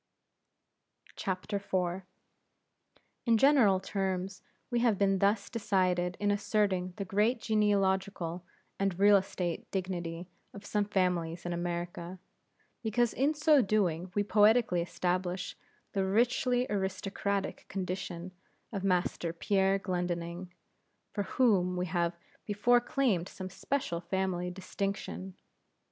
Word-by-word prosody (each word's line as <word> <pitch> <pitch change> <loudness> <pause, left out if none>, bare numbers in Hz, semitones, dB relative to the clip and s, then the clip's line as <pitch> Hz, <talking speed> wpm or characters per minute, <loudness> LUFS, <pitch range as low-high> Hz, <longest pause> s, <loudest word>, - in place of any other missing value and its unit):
IV. 190 -3 -1 1.9
In 230 -1 +5
general 235 -7 +5
terms 190 -1 -3 0.3
we 240 - +2
have 235 -4 +3
been 195 -1 +2
thus 200 +2 +2
decided 185 -6 0
in 205 0 +2
asserting 200 -3 0
the 200 - -3
great 210 +6 +2
genealogical 195 -5 +1 0.4
and 195 -3 0
real 205 +1 +6
estate 185 -3 -1
dignity 175 -2 -3 0.3
of 200 0 -10
some 205 0 0
families 180 -4 0
in 175 - -2
America, 175 +1 -4 0.6
because 235 0 +1
in 285 +4 +1
so 295 -1 +5
doing 185 -5 0
we 205 - +2
poetically 210 -2 +4
establish 180 +1 -2 0.4
the 195 - +1
richly 245 +5 +2
aristocratic 195 0 -2
condition 185 -2 -4 0.4
of 195 -2 -3
Master 180 -2 0
Pierre 195 +3 +2
Glendinning, 175 -1 -3 0.6
for 205 -2 -2
whom 185 -8 +3
we 180 - 0
have 170 -1 -1 0.3
before 230 +4 +3
claimed 235 -9 0
some 185 -1 -7
special 195 -9 -2
family 180 -1 -1
distinction. 190 0 -4
190 Hz, 110 wpm, -31 LUFS, 180-205 Hz, 1.9 s, real